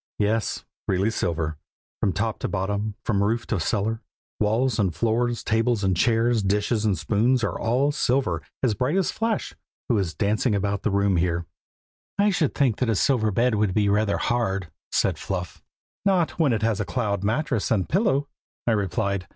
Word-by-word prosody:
"Yes, 105 +1 0 0.2
really 95 +4 +1
silver, 80 -7 -2 0.4
from 100 - +1
top 105 +4 -2
to - - -2
bottom, 100 +2 -2
from 100 -4 +1
roof 115 +3 0
to 110 - -1
cellar, 110 +6 -1 0.4
walls 115 +3 +1
and 95 -6 +1
floors, 115 +5 0
tables 115 -1 +1
and 95 -1 +2
chairs, 115 +3 +2
dishes 105 +3 0
and 100 -4 +2
spoons 115 - +1
are 105 - -1
all 130 +5 +2
silver, 135 -2 0 0.2
as 120 -4 +3
bright 125 - 0
as 190 - +1
Flash, 225 -1 -2 0.4
who 115 -4 +3
is 85 -5 -2
dancing 105 - +1
about 100 0 -1
the - - 0
room 100 -2 +2
here." 85 0 0 0.7
"I 205 +1 +4
should 165 -6 0
think 130 -6 +1
a 115 -3 +2
silver 110 0 +2
bed 115 +4 +2
would 105 -3 +1
be 105 -1 +3
rather 105 0 +2
hard," 95 -8 -1 0.2
said - - +1
Fluff. 90 -2 -4 0.4
"Not 180 -7 +1
when 150 -5 +4
it 110 -2 0
has 110 -3 +1
a 105 - -1
cloud 100 -3 -1
mattress 120 +1 0
and 100 -5 +1
pillow," 165 -7 +1 0.4
I 120 - +2
replied. 100 -2 -1
110 Hz, 175 wpm, -24 LUFS, 100-120 Hz, 0.7 s, I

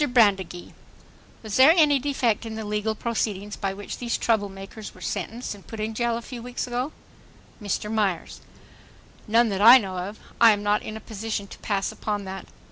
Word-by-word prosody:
BRANDEGEE:... 200 - +2 0.7
Was 215 -2 -3
there 270 +5 +8
any 295 -4 +5
defect 255 -5 0
in 225 -1 -6
the 220 -1 -5
legal 210 +1 -1
proceedings 210 -3 -2
by 195 - -2
which 200 +1 -7
these 240 -1 -1
trouble 215 -3 +1
makers 195 +2 -9
were - - -14
sentenced 235 +1 -4
and 200 -2 -15
put 225 - -8
in 215 +1 -2
jail 235 0 0
a 235 - -7
few 245 -1 -8
weeks 245 +1 -4
ago? 250 +4 -2 0.7
MR. 210 +1 -2
MYERS: 200 -6 -1 0.9
None 230 +2 +4
that 195 -1 -2
I 235 +4 +11
know 190 -6 -3
of. 200 +4 -5 0.2
I 230 -2 +9
am 205 0 -4
not 205 0 +2
in 215 - -6
a - - -10
position 215 -1 -4
to - - -12
pass 200 -3 -1
upon 205 -2 -3
that. 190 0 -7
215 Hz, 195 wpm, -25 LUFS, 200-235 Hz, 0.9 s, I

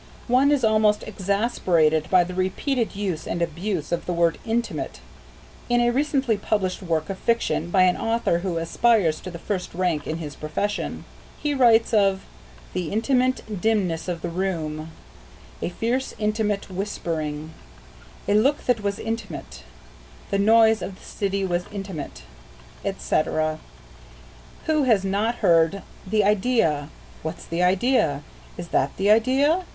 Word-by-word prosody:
One 260 +4 +4
is 285 -4 +2
almost 215 -1 +3
exasperated 185 -7 +1
by 185 -1 +5
the 180 +1 -6
repeated 210 +7 -1
use 190 -6 -3
and 175 - -2
abuse 170 0 -2
of 170 - -2
the 180 - 0
word 170 -1 +2
"intimate" 235 +1 -2 0.7
in 240 0 +3
a 240 0 +3
recently 270 -4 +1
published 200 -2 -1
work 160 -4 -1
of 190 - -7
fiction, 230 -7 0
by 185 +1 +4
an 180 -1 +4
author 225 -6 0
who 175 -2 -2
aspires 165 0 +2
to 185 - -7
the 170 - -7
first 180 0 -4
rank 175 -4 0
in 160 - -2
his 150 -4 -7
profession. 175 +7 -3 0.3
He 295 -1 -1
writes 235 -4 +4
of 195 -3 +3 0.5
"the 175 -4 -3
intimate 240 -3 0
dimness 185 -7 0
of 175 -2 -4
the 175 - -2
room;" 165 -4 -3 0.7
"a - - -1
fierce 235 +8 -2
intimate 210 -2 -1
whispering;" 160 -5 -3 0.8
"a 205 - +2
look 265 +8 +2
that 245 -3 +2
was 200 -1 -1
intimate;" 210 - -5 0.7
"the 200 - +1
noise 220 +1 +5
of 190 - -5
the - - -17
city 200 -1 -2
was 175 -1 -1
intimate," 185 - -6 0.6
etc. 155 0 0 1.1
Who 310 -1 +2
has 215 -6 +3
not 205 +5 0
heard, 165 +3 +4 0.2
"The 210 +2 +2
idea!" 195 - +2 0.3
"What's 160 +2 -6
the 170 +1 -2
idea?" 180 - +2 0.3
"Is 175 -1 -7
that 140 - 0
the 200 +2 +3
idea?" 270 +10 +3
195 Hz, 145 wpm, -24 LUFS, 170-225 Hz, 1.1 s, by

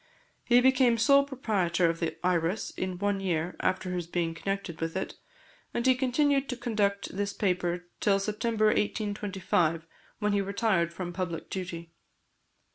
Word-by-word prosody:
He 245 0 +5
became 255 -2 +4
sole 280 +5 +5
proprietor 195 -10 +1
of 165 0 -1
the 165 - -2
Iris 180 +3 0
in 185 -1 -4
one 205 +1 0
year 175 -2 -1
after 185 0 0
his 175 -2 -3
being 170 -1 -1
connected 195 -1 -4
with 165 +2 -2
it, 190 - -3 0.6
and 235 - 0
he 260 - +6
continued 275 +2 +1
to 250 - -3
conduct 205 -6 -1
this 200 0 -1
paper 180 -2 -1
till 200 -2 +3
September 215 +2 0
1825, 200 -6 0 0.3
when 210 -1 0
he 200 - +2
retired 195 -4 +1
from 175 0 -5
public 175 -2 -4
duty. 170 -3 -5
195 Hz, 150 wpm, -29 LUFS, 175-220 Hz, 0.6 s, he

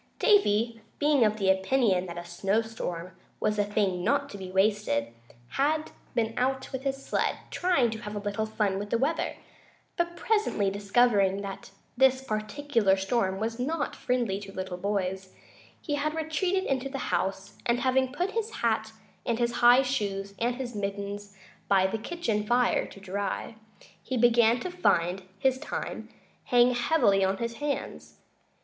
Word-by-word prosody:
Davy, 230 - +3 0.2
being 290 -3 +4
of 215 0 +2
the 195 -2 +3
opinion 190 -1 +2
that 170 0 -7
a 175 - -6
snow 195 +5 0
storm 185 -6 -5 0.3
was 210 0 0
a - - +4
thing 200 -3 0
not 280 +5 +1
to 200 - -7
be 190 -1 -7
wasted, 190 - +1 0.4
had 305 +3 0 0.2
been 225 -1 +1
out 265 +1 0
with 265 -1 -4
his 270 0 -3
sled, - - 0
trying 315 -11 +2
to 220 - -5
have 210 0 -7
a - - -2
little 205 +1 -2
fun 205 -3 0
with 205 +1 -5
the 235 - +2
weather; 285 +7 0 0.6
but 345 0 0
presently, 415 - +1
discovering 200 -1 +2
that 195 -1 -7 0.3
this 265 +1 +4
particular 215 -2 +1
storm 195 -1 0
was 225 +2 -3
not 290 +3 -1
friendly 235 -6 -1
to 200 -1 -9
little 185 -1 -5
boys, 190 -1 -2 0.4
he 295 - -4
had 300 +2 -1
retreated 325 +4 0
into 270 -3 -1
the 270 -1 -4
house, 195 +1 -2
and 240 +1 +2
having 260 0 +2
put 355 +7 -1
his 450 0 -2
hat 220 - -1 0.3
and 235 -2 0
his 240 0 +1
high 245 +2 +7
shoes 200 -7 -2
and 240 +1 +1
his 250 -1 -5
mittens 200 0 -4 0.3
by 195 -1 +4
the 220 +4 -1
kitchen 225 -6 -2
fire 240 +3 +2
to - - -13
dry, 200 +2 -3 0.5
he 260 - -3
began 235 0 +5
to 365 - -4
find 185 - +1 0.2
his 260 +4 +1
time 300 - -5 0.4
hang 245 0 +5
heavily 240 -6 +3
on 190 +1 +1
his 235 +1 -4
hands. 290 -1 -4
225 Hz, 165 wpm, -28 LUFS, 195-265 Hz, 0.6 s, high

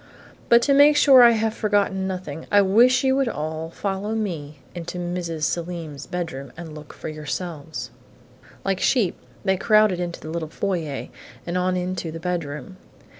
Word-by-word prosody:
But 235 0 +6
to 280 - +3
make 290 +1 +6
sure 270 -3 +8
I 240 - +9
have 220 0 0
forgotten 205 -3 0
nothing, 180 -5 -6
I 205 0 +6
wish 235 +8 +4
you 265 0 +3
would 270 -2 +2
all 160 -2 -4
follow 200 +4 -3
me 160 -9 -4 0.2
into 175 0 -6
Mrs. 175 -2 -3
Selim's 165 -3 -3
bedroom 140 -7 -5
and 170 -3 -8
look 150 -1 -10
for - - -8
yourselves." 155 0 -5 0.7
Like 195 -1 0
sheep, 220 -8 +2 0.3
they 190 -1 +2
crowded 215 -2 +4
into 175 -1 -4
the 155 - -8
little 160 -2 -3
foyer 165 -6 -3 0.4
and 175 - -3
on 180 0 +1
into 180 -2 -3
the 165 - -7
bedroom. 170 0 -4
180 Hz, 165 wpm, -23 LUFS, 160-205 Hz, 0.7 s, I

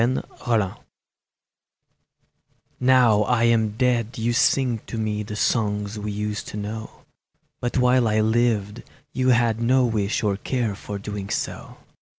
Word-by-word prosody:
AN 130 +2 +1 0.2
UPBRAIDING 110 -6 0 2.1
NOW 125 -4 +4
I 115 +2 +1
am 110 -2 +2
dead 120 -2 0
you 115 +1 0
sing 125 -2 +2
to 115 - -5
me 105 -1 -2
The 105 0 -6
songs 105 -1 0
we 105 0 -4
used 105 0 -4
to - - -7
know, 110 +2 -7 0.6
But 120 +2 -2
while 125 -1 +3
I 110 0 +2
lived 110 -1 +1 0.3
you 130 0 +1
had 115 -2 +2
no 125 +2 +3
wish 110 -3 -1
Or 100 -2 +1
care 120 0 -2
for 100 +1 -7
doing 100 -1 -6
so. - - -4
110 Hz, 145 wpm, -23 LUFS, 105-120 Hz, 2.1 s, NOW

